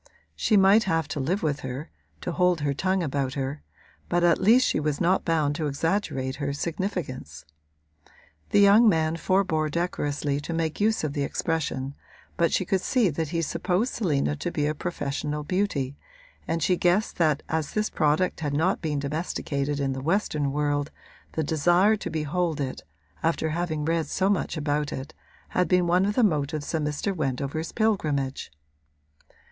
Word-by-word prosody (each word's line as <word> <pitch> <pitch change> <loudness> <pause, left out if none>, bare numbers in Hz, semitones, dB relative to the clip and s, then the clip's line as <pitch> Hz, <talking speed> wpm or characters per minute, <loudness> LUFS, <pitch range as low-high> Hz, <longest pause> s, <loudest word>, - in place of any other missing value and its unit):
She 215 - +2
might 195 +3 +6
have 165 -3 0
to 150 - -3
live 170 +9 -1
with 150 -2 0
her, 130 +3 -6 0.3
to - - -3
hold 180 -3 +2
her 145 -1 0
tongue 185 +5 0
about 135 -3 -2
her; 140 +1 -3 0.5
but 175 0 +2
at 170 -1 +4
least 240 +5 +6
she - - +1
was 150 -1 -1
not 180 +2 +2
bound 155 -4 +1
to 155 - -1
exaggerate 140 -3 -1
her 140 -1 -2
significance. 150 - -4 1.0
The - - +2
young 210 +3 +7
man 160 -3 +1
forbore 165 -3 +1
decorously 145 -3 -1
to 155 +3 -5
make 165 +1 -2
use 220 -2 +2
of 150 -2 -1
the 145 - -2
expression, 140 -2 -2 0.4
but 170 -1 +2
she 185 - +1
could 190 +1 +1
see 230 -6 +2
that 160 +2 -2
he 165 +3 -1
supposed 180 - 0
Selina 150 -8 0
to 175 - -3
be 150 -3 0
a 150 - +1
professional 150 -2 -3
beauty 145 -6 -1 0.5
and 165 -1 -1
she 180 +1 +2
guessed 180 +6 +1
that 155 -4 +2
as 160 -2 -2
this 215 0 0
product 155 +3 +1
had 145 -3 -2
not 180 +6 +2
yet - - -29
been 155 -4 -1
domesticated 145 -1 -2
in 135 -1 0
the 130 - -5
western 150 -3 0
world 145 0 0 0.4
the 160 - 0
desire 175 +8 +3
to - - -5
behold 160 +1 -1
it, 135 -2 -3 0.4
after 160 -1 0
having 160 -2 -2
read 165 -1 0
so 190 +6 +1
much 190 -4 -1
about 145 0 -1
it, 135 +3 -6 0.4
had 180 - +1
been 180 -1 +3
one 180 +3 +3
of 205 - -1
the 250 - +3
motives 150 -5 0
of 160 - +1
Mr. 150 +7 -2
Wendover's 140 +1 -2
pilgrimage. 150 - 0
160 Hz, 175 wpm, -26 LUFS, 145-180 Hz, 1.0 s, young